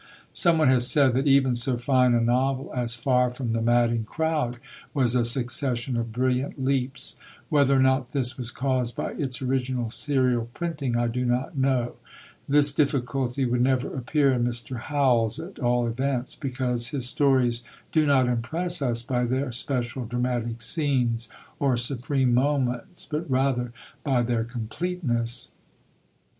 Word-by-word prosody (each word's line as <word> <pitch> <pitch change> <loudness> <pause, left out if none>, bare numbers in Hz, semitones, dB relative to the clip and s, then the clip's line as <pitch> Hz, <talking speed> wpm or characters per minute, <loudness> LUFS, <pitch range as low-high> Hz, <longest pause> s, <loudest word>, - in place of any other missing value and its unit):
Someone 165 -5 +4
has 125 -2 +5
said, 140 -4 +4
that 135 +4 0
even 135 -2 +4
so 120 +1 +1
fine 125 0 +3
a 120 - +2
novel 130 +3 0
as 120 -2 0
Far 125 +1 +2
from 125 -2 -4
the 115 - -1
Madding 120 0 +2
Crowd 150 -2 -2 0.4
was 125 -4 +2
a 125 -1 +2
succession 120 +1 0
of 115 -1 -2
brilliant 130 +3 -1
leaps; 130 -1 -1 0.3
whether 140 -2 +3
or - - +3
not 130 -1 +2
this 130 -2 -1
was 125 -4 -2
caused 130 -2 -1
by - - -3
its 130 -3 -3
original 125 -3 -1
serial 130 -4 0
printing, 145 -8 -2
I 120 - +1
do 120 +2 -2
not 125 +3 -1
know. 130 -3 0 0.5
This 145 0 +5
difficulty 135 -2 0
would 120 0 0
never 130 +1 +1
appear 135 +2 +1
in 120 -1 0
Mr. 120 +1 -4
Howells, 125 -5 +1
at 175 +4 -9
all 120 -1 +1
events; 130 +2 -2
because 125 -3 -2
his 130 -1 -2
stories 125 -3 +2 0.3
do 155 -2 +2
not 135 -3 +4
impress 160 +9 +1
us 120 -3 +1
by 125 0 -1
their 130 +2 -1
special 125 0 -2
dramatic 120 -1 -2
scenes, 120 -5 0 0.3
or 135 -4 +2
supreme 125 +1 0
moments, 130 +2 0
but 155 +1 -4
rather 130 -2 0 0.3
by 130 -5 +1
their 115 -1 -1
completeness. 120 0 -2
125 Hz, 150 wpm, -25 LUFS, 120-135 Hz, 0.5 s, has